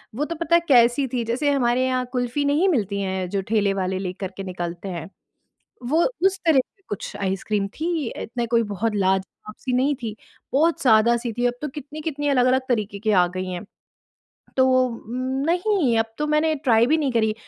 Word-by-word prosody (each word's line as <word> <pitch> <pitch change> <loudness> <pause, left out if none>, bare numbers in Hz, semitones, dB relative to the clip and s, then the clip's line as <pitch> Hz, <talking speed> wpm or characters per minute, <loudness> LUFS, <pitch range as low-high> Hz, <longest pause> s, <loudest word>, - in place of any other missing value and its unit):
वो 295 +4 -1
तो 335 - -4
पता 335 +1 +1
है 340 - +5
कैसी 245 +1 +4
थी, 240 -1 -2
जैसे 285 +4 +1
हमारे 255 -1 +2
यहाँ 255 -1 0
कुल्फ़ी 250 +3 -1
नहीं 310 +7 +3
मिलती 200 - 0
हैं 190 -2 -2
जो 200 0 -1
ठेले 205 -3 +2
वाले 185 0 -1
लेकर 190 0 -5
के 195 - -4
निकलते 175 0 -5
हैं। 165 +3 -7 0.8
वो 325 +3 +3 0.2
उस 385 0 +2
तरह 310 -5 +5
की 390 +9 -6
कुछ 205 - -5
आइसक्रीम 195 +1 -1
थी 325 - -1 0.3
इतना 235 +1 -3
कोई 230 -1 +4
बहुत 225 +4 -1
लाज़वाब-सी 195 +5 -2
नहीं 270 +3 +2
थी 220 -2 -4 0.4
बहुत 320 +4 +3
सादा-सी 235 0 +3
थी। 245 - +1
अब 245 - +2
तो 300 - -2
कितनी-कितनी 295 +1 -5
अलग-अलग 260 -1 +3
तरीके 210 -4 -1
की 215 0 0
आ 180 -3 +5
गई 185 - -2
हैं। 180 +4 -5 0.9
तो 260 - +5 0.8
नहीं, 350 - +2
अब 225 - +3
तो 300 - 0
मैंने 305 +1 +2
ट्राई 240 -6 +3
भी 310 +4 +3
नहीं 280 -5 0
करी। 220 -2 +1
245 Hz, 185 wpm, -23 LUFS, 205-290 Hz, 0.9 s, है